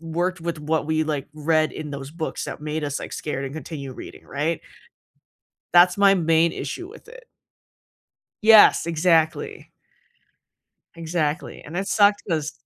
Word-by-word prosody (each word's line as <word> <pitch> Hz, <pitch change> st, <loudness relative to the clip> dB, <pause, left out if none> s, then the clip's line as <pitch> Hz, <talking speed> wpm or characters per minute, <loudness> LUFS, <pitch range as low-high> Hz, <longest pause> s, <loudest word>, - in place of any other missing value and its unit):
worked 175 Hz, +2 st, -2 dB
with 165 Hz, -2 st, -4 dB
what 155 Hz, 0 st, -1 dB
we, 155 Hz, 0 st, +1 dB
like, 145 Hz, -3 st, -3 dB
read 155 Hz, +1 st, +1 dB
in 150 Hz, -2 st, -7 dB
those 140 Hz, 0 st, -7 dB
books 160 Hz, 0 st, -5 dB
that -, -, -7 dB
made 155 Hz, 0 st, -3 dB
us, 145 Hz, -1 st, -3 dB
like, -, -, -8 dB
scared 140 Hz, -3 st, -4 dB
and 135 Hz, +2 st, -6 dB
continue 140 Hz, -3 st, -7 dB
reading, -, -, -11 dB
right? 150 Hz, +4 st, -2 dB, 1.1 s
That's 175 Hz, +2 st, +6 dB
my 200 Hz, -1 st, +6 dB
main 165 Hz, -1 st, +2 dB
issue 355 Hz, -, -6 dB
with 455 Hz, -, -15 dB
it. -, -, -14 dB, 1.2 s
Yes, 220 Hz, -6 st, +7 dB
exactly. 165 Hz, -1 st, 0 dB, 1.3 s
Exactly, 165 Hz, -1 st, -3 dB
and 165 Hz, +4 st, -9 dB
it 195 Hz, +1 st, -2 dB
sucks 205 Hz, -1 st, +3 dB
'cause 155 Hz, -4 st, -1 dB
160 Hz, 145 wpm, -23 LUFS, 150-175 Hz, 1.3 s, Yes